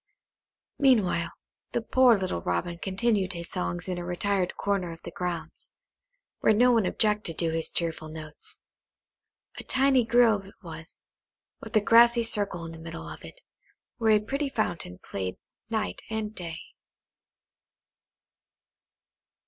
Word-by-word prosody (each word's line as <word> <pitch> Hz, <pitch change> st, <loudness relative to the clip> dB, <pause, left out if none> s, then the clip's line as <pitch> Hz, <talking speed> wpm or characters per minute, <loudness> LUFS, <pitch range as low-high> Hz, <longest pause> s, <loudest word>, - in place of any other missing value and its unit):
Meanwhile, 205 Hz, -11 st, +3 dB, 0.4 s
the 240 Hz, -, +1 dB
poor 250 Hz, -1 st, +5 dB
little 185 Hz, -, -2 dB
Robin 90 Hz, -, -2 dB
continued 195 Hz, 0 st, 0 dB
his 170 Hz, -1 st, -6 dB
songs 180 Hz, -1 st, -3 dB
in 180 Hz, -1 st, -2 dB
a -, -, -5 dB
retired 180 Hz, +1 st, -1 dB
corner 195 Hz, -4 st, -1 dB
of 165 Hz, -, -9 dB
the 170 Hz, -, -7 dB
grounds, 170 Hz, -3 st, -5 dB, 0.7 s
where -, -, +4 dB
no 245 Hz, +4 st, +5 dB
one 225 Hz, -6 st, +3 dB
objected 210 Hz, -6 st, 0 dB
to 165 Hz, -1 st, +1 dB
his 165 Hz, 0 st, -1 dB
cheerful 165 Hz, -2 st, -1 dB
notes. 155 Hz, -1 st, -10 dB, 1.0 s
A -, -, -7 dB
tiny 265 Hz, -1 st, +3 dB
grove 225 Hz, -4 st, +3 dB
it 200 Hz, -, -15 dB
was, 165 Hz, -1 st, -10 dB, 0.6 s
with 225 Hz, 0 st, -9 dB
a 215 Hz, -, +6 dB
grassy 235 Hz, +2 st, +6 dB
circle 200 Hz, -6 st, -2 dB
in 165 Hz, -, -7 dB
the 165 Hz, -, -10 dB
middle 165 Hz, 0 st, -7 dB
of -, -, -9 dB
it, -, -, -10 dB, 0.6 s
where 225 Hz, -2 st, +4 dB
a -, -, 0 dB
pretty 275 Hz, +7 st, -2 dB
fountain 175 Hz, -, -2 dB
played 95 Hz, -2 st, -5 dB, 0.3 s
night 220 Hz, -2 st, -2 dB
and 220 Hz, -1 st, -3 dB
day. 170 Hz, -5 st, -5 dB
190 Hz, 140 wpm, -27 LUFS, 170-225 Hz, 1.0 s, a